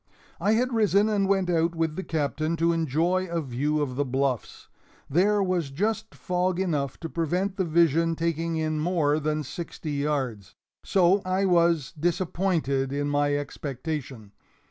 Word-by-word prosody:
I 210 Hz, -, +2 dB
had 250 Hz, +3 st, +1 dB
risen 210 Hz, -2 st, +3 dB
and 200 Hz, -2 st, +1 dB
went 195 Hz, -2 st, +2 dB
out 170 Hz, -1 st, +1 dB
with 165 Hz, -2 st, -1 dB
the 190 Hz, -, -3 dB
Captain, 155 Hz, +1 st, -1 dB
to 170 Hz, +1 st, +2 dB
enjoy 165 Hz, +4 st, +1 dB
a 170 Hz, 0 st, -1 dB
view 145 Hz, +2 st, -1 dB
of 130 Hz, -3 st, -4 dB
the 145 Hz, -, +2 dB
bluffs. 130 Hz, -2 st, -2 dB, 0.4 s
There 200 Hz, +7 st, +3 dB
was 180 Hz, -6 st, 0 dB
just 220 Hz, +9 st, -2 dB
fog 180 Hz, 0 st, -1 dB
enough 150 Hz, -8 st, -1 dB
to 165 Hz, -, -3 dB
prevent 180 Hz, +4 st, -1 dB
the 190 Hz, -, 0 dB
vision 165 Hz, 0 st, +3 dB
taking 165 Hz, 0 st, -1 dB
in 155 Hz, -1 st, -1 dB
more 155 Hz, -3 st, +1 dB
than 155 Hz, 0 st, -1 dB
sixty 155 Hz, +2 st, -6 dB
yards 130 Hz, -9 st, -2 dB, 0.3 s
so 190 Hz, +1 st, +3 dB
I 185 Hz, +1 st, 0 dB
was 170 Hz, -4 st, +3 dB
disappointed 165 Hz, -4 st, 0 dB
in 145 Hz, +1 st, -1 dB
my 145 Hz, 0 st, +2 dB
expectation. 140 Hz, -5 st, -5 dB
165 Hz, 155 wpm, -26 LUFS, 145-180 Hz, 0.4 s, risen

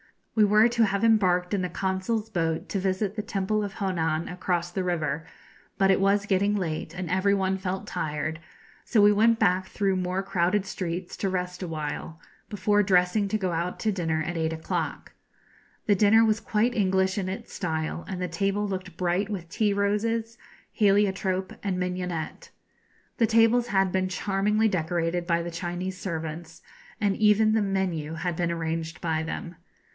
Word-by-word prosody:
We 215 Hz, -2 st, +5 dB
were 210 Hz, +2 st, +5 dB
to 235 Hz, -1 st, +3 dB
have 200 Hz, +1 st, -1 dB
embarked 185 Hz, -5 st, +3 dB
in 200 Hz, -, +1 dB
the 180 Hz, -, -2 dB
Consul's 190 Hz, +4 st, -1 dB
boat 165 Hz, -4 st, -1 dB
to 200 Hz, -, -1 dB
visit 190 Hz, +2 st, -1 dB
the 215 Hz, -, -1 dB
Temple 205 Hz, +1 st, -1 dB
of 200 Hz, -1 st, -4 dB
Honan 165 Hz, -6 st, -1 dB
across 175 Hz, -1 st, -2 dB
the 190 Hz, +1 st, -2 dB
river, 160 Hz, -3 st, -2 dB, 0.5 s
but 195 Hz, 0 st, +4 dB
it 190 Hz, -, +3 dB
was 200 Hz, +1 st, +2 dB
getting 200 Hz, +1 st, +2 dB
late, 165 Hz, -3 st, -3 dB
and 180 Hz, -2 st, -4 dB
every 195 Hz, +2 st, +3 dB
one 190 Hz, 0 st, 0 dB
felt 190 Hz, +1 st, -3 dB
tired; 155 Hz, -3 st, -3 dB, 0.4 s
so 225 Hz, -, +1 dB
we 205 Hz, 0 st, +7 dB
went 225 Hz, +2 st, +4 dB
back 185 Hz, -2 st, +2 dB
through 195 Hz, -2 st, 0 dB
more 185 Hz, +1 st, -1 dB
crowded 190 Hz, +1 st, +1 dB
streets 180 Hz, -2 st, -4 dB
to 195 Hz, -, -1 dB
rest 180 Hz, 0 st, -3 dB
awhile, 160 Hz, -1 st, -5 dB, 0.3 s
before 205 Hz, 0 st, +2 dB
dressing 190 Hz, +1 st, +3 dB
to 215 Hz, -, 0 dB
go 190 Hz, -4 st, -1 dB
out 170 Hz, +2 st, -2 dB
to 220 Hz, -, +1 dB
dinner 165 Hz, -5 st, -1 dB
at 175 Hz, -1 st, -3 dB
eight 160 Hz, 0 st, 0 dB
o'clock. 160 Hz, 0 st, -3 dB, 0.7 s
The 205 Hz, -, +4 dB
dinner 215 Hz, +3 st, +5 dB
was 215 Hz, -1 st, +2 dB
quite 225 Hz, +3 st, +1 dB
English 190 Hz, -3 st, +1 dB
in 185 Hz, -1 st, -2 dB
its 190 Hz, -, -7 dB
style, 160 Hz, -1 st, -3 dB
and 185 Hz, -, -4 dB
the 180 Hz, -, -1 dB
table 195 Hz, +4 st, -1 dB
looked 185 Hz, -3 st, -5 dB
bright 180 Hz, +3 st, 0 dB
with 180 Hz, -5 st, -5 dB
tea 205 Hz, +2 st, +1 dB
roses, 225 Hz, +3 st, 0 dB, 0.3 s
heliotrope, 195 Hz, -2 st, +1 dB
and 195 Hz, -3 st, -1 dB
mignonette. 180 Hz, -, -4 dB, 0.7 s
The 230 Hz, -, +3 dB
tables 230 Hz, +2 st, +4 dB
had 195 Hz, -4 st, +2 dB
been 185 Hz, 0 st, +1 dB
charmingly 205 Hz, +3 st, +1 dB
decorated 170 Hz, -1 st, -1 dB
by 170 Hz, -1 st, +1 dB
the 175 Hz, -, -5 dB
Chinese 175 Hz, +2 st, -4 dB
servants, 160 Hz, -2 st, -5 dB, 0.4 s
and 205 Hz, -2 st, +1 dB
even 215 Hz, 0 st, +4 dB
the 220 Hz, -, +3 dB
menu 185 Hz, -6 st, -1 dB
had 175 Hz, 0 st, -2 dB
been 170 Hz, 0 st, 0 dB
arranged 165 Hz, 0 st, -3 dB
by 160 Hz, -2 st, 0 dB
them. 165 Hz, +1 st, -5 dB
190 Hz, 175 wpm, -26 LUFS, 175-205 Hz, 0.7 s, we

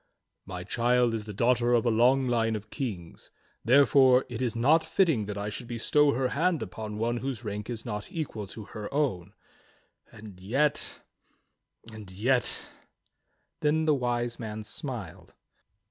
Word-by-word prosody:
"My 90 Hz, -2 st, -6 dB
child 120 Hz, +3 st, +2 dB
is 110 Hz, -2 st, -3 dB
the 105 Hz, -, -7 dB
daughter 120 Hz, +1 st, +3 dB
of 120 Hz, -, +1 dB
a 120 Hz, -, +3 dB
long 125 Hz, +4 st, +4 dB
line 115 Hz, -2 st, +1 dB
of 105 Hz, 0 st, -8 dB
kings, 100 Hz, -, -6 dB, 0.3 s
therefore 130 Hz, 0 st, +5 dB
it 120 Hz, 0 st, -5 dB
is 120 Hz, -3 st, -1 dB
not 150 Hz, +8 st, +4 dB
fitting 155 Hz, -, +1 dB
that 105 Hz, -1 st, -5 dB
I 100 Hz, +1 st, -3 dB
should 115 Hz, +3 st, -6 dB
bestow 140 Hz, +5 st, +2 dB
her 130 Hz, +1 st, 0 dB
hand 165 Hz, +1 st, +1 dB
upon 105 Hz, -1 st, -6 dB
one 120 Hz, +2 st, 0 dB
whose 130 Hz, -2 st, -4 dB
rank 105 Hz, 0 st, -5 dB
is 115 Hz, -1 st, -5 dB
not 105 Hz, -3 st, -5 dB
equal 125 Hz, -, -4 dB
to 110 Hz, +3 st, -9 dB
her 105 Hz, 0 st, -8 dB
own; 110 Hz, -, -1 dB, 0.8 s
and 105 Hz, -4 st, -12 dB
yet 135 Hz, +10 st, 0 dB, 0.4 s
— 115 Hz, -, -21 dB
and 105 Hz, -3 st, -10 dB
yet 120 Hz, +7 st, 0 dB, 0.3 s
— -, -, -47 dB
" -, -, -48 dB
Then 155 Hz, +1 st, +2 dB
the 155 Hz, -, +4 dB
Wise 120 Hz, -3 st, -1 dB
Man 110 Hz, -2 st, -5 dB
smiled. 110 Hz, -, -7 dB
120 Hz, 165 wpm, -28 LUFS, 105-130 Hz, 0.8 s, therefore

